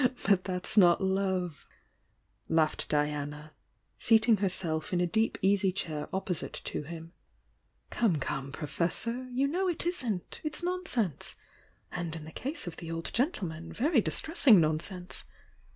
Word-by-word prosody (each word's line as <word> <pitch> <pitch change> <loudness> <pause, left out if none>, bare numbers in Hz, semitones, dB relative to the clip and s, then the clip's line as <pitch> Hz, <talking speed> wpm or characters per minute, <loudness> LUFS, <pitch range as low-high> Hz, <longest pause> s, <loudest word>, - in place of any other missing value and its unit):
"But 195 -2 +4
that's 180 +2 -1
not 175 0 +5
love!" 190 -4 -1 0.8
laughed 160 -1 +1
Diana, 150 0 -2 0.5
seating 225 0 +5
her 195 -1 +1
self 160 -4 -3
in 175 - +2
a 180 - +3
deep 220 +6 +1
easy 195 0 +3
chair 155 -5 -4
opposite 185 -4 -3
to - - -3
him. 165 +2 -9 0.8
"Come, 220 -8 +2
come, 135 -1 -3
Professor! 205 - -2
You 260 +3 +1
know 365 +6 0
it 345 -2 -1
isn't! 250 - -2
It's 305 +2 -1
nonsense! 350 - -2 0.3
— - - -37
and 170 -2 -3
in 160 - -7
the 160 - -9
case 275 - -4
of 175 - -6
the 165 - -7
old 165 0 -4
gentleman, 175 - -1
very 270 - +2
dis - - +2
tressing 280 - +6
nonsense! 170 +4 -2
185 Hz, 150 wpm, -30 LUFS, 160-230 Hz, 0.8 s, tressing